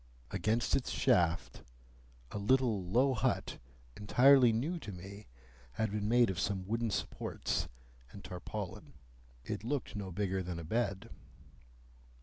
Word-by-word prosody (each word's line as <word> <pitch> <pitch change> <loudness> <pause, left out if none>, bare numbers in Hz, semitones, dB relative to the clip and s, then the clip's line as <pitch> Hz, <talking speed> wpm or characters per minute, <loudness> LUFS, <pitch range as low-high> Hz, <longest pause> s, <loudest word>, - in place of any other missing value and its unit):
Against 110 +1 +1
its 135 - -1
shaft, 85 -1 +1 0.7
a 105 - -4
little 115 -2 +2
low 125 +9 +3
hut, 125 +1 -1 0.4
entirely 125 +4 +6
new 145 +11 -1
to 105 - -7
me, 95 +3 -10 0.5
had 110 +4 -1
been 105 0 -1
made 120 -3 +5
of 95 - -4
some 95 -1 -1
wooden 115 +3 -1
supports - - -2 0.4
and 100 - -11
tarpaulin. 90 -2 -6 0.5
It - - -4
looked 130 -1 -3
no 100 -2 -4
bigger 95 +1 -1
than 90 -1 -4
a 85 - -6
bed. 100 +2 -2
105 Hz, 135 wpm, -33 LUFS, 95-120 Hz, 0.7 s, entirely